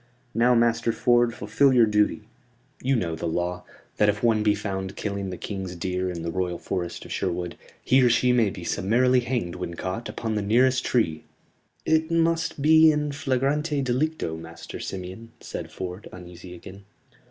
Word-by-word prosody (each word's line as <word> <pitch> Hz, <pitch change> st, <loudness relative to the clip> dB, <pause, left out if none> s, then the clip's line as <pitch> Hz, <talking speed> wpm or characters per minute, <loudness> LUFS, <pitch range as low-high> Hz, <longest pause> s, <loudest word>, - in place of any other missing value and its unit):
"Now, 120 Hz, +2 st, +4 dB
Master 115 Hz, 0 st, +2 dB
Ford, 120 Hz, +1 st, +3 dB
fulfil 120 Hz, +5 st, +2 dB
your 120 Hz, -3 st, +6 dB
duty. 105 Hz, 0 st, +1 dB, 0.6 s
You 135 Hz, +1 st, +1 dB
know 85 Hz, -8 st, -1 dB
the 80 Hz, -, -4 dB
law; 90 Hz, +2 st, -2 dB, 0.3 s
that 105 Hz, -, +4 dB
if 105 Hz, +2 st, -2 dB
one 115 Hz, -2 st, +3 dB
be 105 Hz, -1 st, +3 dB
found 95 Hz, -2 st, -4 dB
killing 100 Hz, -2 st, -3 dB
the 90 Hz, -, -6 dB
King's 95 Hz, -3 st, -5 dB
deer 90 Hz, +2 st, -2 dB
in 85 Hz, -2 st, -5 dB
the 85 Hz, -, -3 dB
Royal 90 Hz, -1 st, -2 dB
Forest 90 Hz, -2 st, -4 dB
of -, -, -11 dB
Sherwood, 90 Hz, -2 st, -2 dB, 0.3 s
he 130 Hz, +1 st, +4 dB
or 125 Hz, -, +5 dB
she 125 Hz, +1 st, +3 dB
may 120 Hz, -4 st, +3 dB
be 90 Hz, -2 st, -8 dB
summarily 125 Hz, +9 st, +2 dB
hanged 120 Hz, -8 st, -2 dB
when 90 Hz, -2 st, -5 dB
caught 95 Hz, +7 st, -4 dB
upon 110 Hz, -1 st, -3 dB
the 105 Hz, -, 0 dB
nearest 125 Hz, +5 st, +3 dB
tree." 80 Hz, -11 st, 0 dB, 0.6 s
"It 160 Hz, 0 st, +2 dB
must 165 Hz, -3 st, 0 dB
be 160 Hz, +1 st, +7 dB
in 150 Hz, -1 st, -1 dB
flagrante 140 Hz, +2 st, 0 dB
delicto, 130 Hz, -, -1 dB
Master 80 Hz, 0 st, -9 dB
Simeon," 95 Hz, +5 st, -7 dB
said -, -, -7 dB
Ford, 90 Hz, +2 st, -6 dB
uneasy 90 Hz, 0 st, -11 dB
again. 95 Hz, +3 st, -12 dB
105 Hz, 175 wpm, -25 LUFS, 90-125 Hz, 0.6 s, be